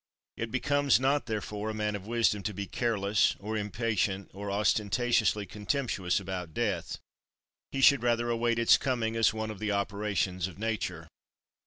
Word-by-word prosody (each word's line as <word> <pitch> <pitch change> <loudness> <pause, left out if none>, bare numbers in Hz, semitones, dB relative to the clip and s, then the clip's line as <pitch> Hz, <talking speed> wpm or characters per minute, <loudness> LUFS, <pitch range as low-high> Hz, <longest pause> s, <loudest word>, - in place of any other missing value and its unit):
It 115 - -4
becomes 145 +2 +2
not 135 +2 +1
therefore 105 -1 -3
a 110 - -4
man 105 -1 -1
of 100 0 -7
wisdom 115 -3 +2
to 100 +1 -4
be 100 +1 -3
careless, 105 -1 +1
or 110 +3 -5
impatient, 105 -2 -1
or 100 +1 -6
ostentatiously 105 +1 +1
contemptuous 105 -2 -1
about 90 -4 -6
death; - - -1 0.7
he 135 - -2
should 140 -2 +6
rather 120 0 +1
await 115 0 +1
its 115 -1 +6
coming 115 -4 -1
as 115 -1 +4
one 110 0 -4
of 105 - -9
the 105 -1 -1
operations 100 -3 -1
of 95 - -11
nature. 100 -7 -3
105 Hz, 160 wpm, -29 LUFS, 100-115 Hz, 0.7 s, should